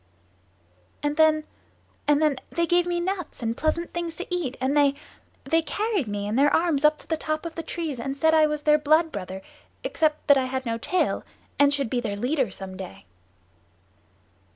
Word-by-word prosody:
"And 295 0 0
then, 310 -1 +4 0.6
and 295 0 +4
then, 305 -3 +2
they 340 - 0
gave 350 +1 +2
me 350 0 0
nuts 360 -7 -4
and 225 0 -1
pleasant 315 +4 -1
things 340 -1 -3
to 365 - -5
eat, 305 -8 -2
and 260 +3 0
they 285 -1 +4 0.5
they 325 0 +2
carried 410 - -1
me 205 -1 -3
in 215 +3 -1
their 285 +2 +5
arms 320 -4 +2
up 300 0 +5
to - - -17
the 325 - 0
top 310 +1 -3
of 335 - -5
the 330 - -4
trees 320 -6 -4
and 270 +3 -4
said 320 +2 +3
I 310 -1 +5
was 300 -1 -3
their 300 0 +5
blood 310 +2 +3
brother 190 -4 -6 0.4
except 305 -1 0
that 285 -2 +6
I 260 - 0
had 260 0 -3
no 230 -1 -2
tail, 365 +10 0 0.4
and 285 0 +6
should 280 -3 0
be 245 - 0
their 210 -4 -3
leader 255 +3 0
some 190 0 -8
day." 100 - -9
300 Hz, 200 wpm, -25 LUFS, 260-325 Hz, 0.6 s, that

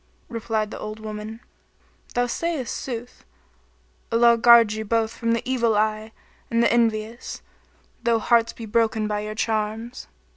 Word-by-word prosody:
Replied 225 -2 -2
the - - -7
old 215 +1 -6
woman, 215 +1 -7 0.7
"Thou 245 0 +2
sayest 290 0 -2
sooth, 245 -1 -6 0.9
Allah 235 +1 +5
guard 230 -2 +6
you 220 0 -4
both 225 +1 0
from 230 -1 0
the 230 - -2
evil 235 -4 +2
eye 215 +1 0 0.4
and 230 0 +2
the - - +3
envious, 230 0 -1 0.6
though 235 -1 +2
hearts 230 0 +3
be 230 - -9
broken 220 0 +1
by 210 0 -1
your 215 +1 -5
charms!" 220 +2 -2
225 Hz, 145 wpm, -24 LUFS, 215-235 Hz, 0.9 s, guard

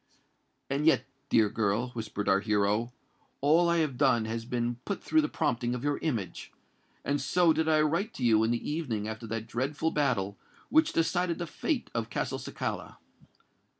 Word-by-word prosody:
"And 140 +3 0
yet, 160 - +4 0.2
dear 110 -2 +5
girl," 110 +3 0
whispered 110 -4 -5
our 95 - +4
hero, 105 +2 +1 0.5
"all 165 +5 +4
I 170 - +3
have 130 -4 -7
done 130 -6 +3
has 115 +1 -4
been 120 0 -2
but 200 - -4
through 315 - +3
the 305 - -1
prompting 120 +1 0
of 125 - -6
your 145 0 0
image; 115 - -3 0.5
and 145 0 0
so 175 -2 +3
did 160 0 0
I 155 -1 +4
write 170 +8 0
to 130 - -5
you 110 -2 +4
in 110 - +2
the 120 0 -1
evening 125 -10 -2
after 110 +1 -6
that 115 0 -3
dreadful 140 +8 -1
battle 100 -9 0 0.3
which 315 +1 +4
decided 170 +1 +1
the 175 - -3
fate 265 - -2
of 115 -1 -2
Castelcicala." - - -4
125 Hz, 175 wpm, -29 LUFS, 110-160 Hz, 0.5 s, dear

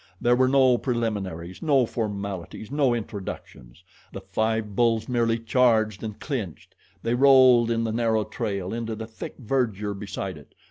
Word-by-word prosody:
There 120 0 +3
were 130 +1 +3
no 130 -2 +4
preliminaries, 100 -8 -3
no 140 -5 +3
formalities, 100 -2 -5
no 140 -4 +2
introductions 95 - -8 0.3
the 95 - -7
five 105 +2 -2
bulls 115 -1 +2
merely 115 -2 +1
charged 115 -3 +2
and 105 -2 -6
clinched. 115 - -5 0.3
They 115 - 0
rolled 130 -2 +6
in 115 0 0
the 110 - -1
narrow 110 -1 +1
trail 100 -5 -4
and - - -3
into 115 -1 -4
the 110 +1 -6
thick 110 0 -9
verdure 110 -5 -1
beside 95 -3 -6
it. 75 - -20
115 Hz, 155 wpm, -25 LUFS, 100-120 Hz, 0.3 s, rolled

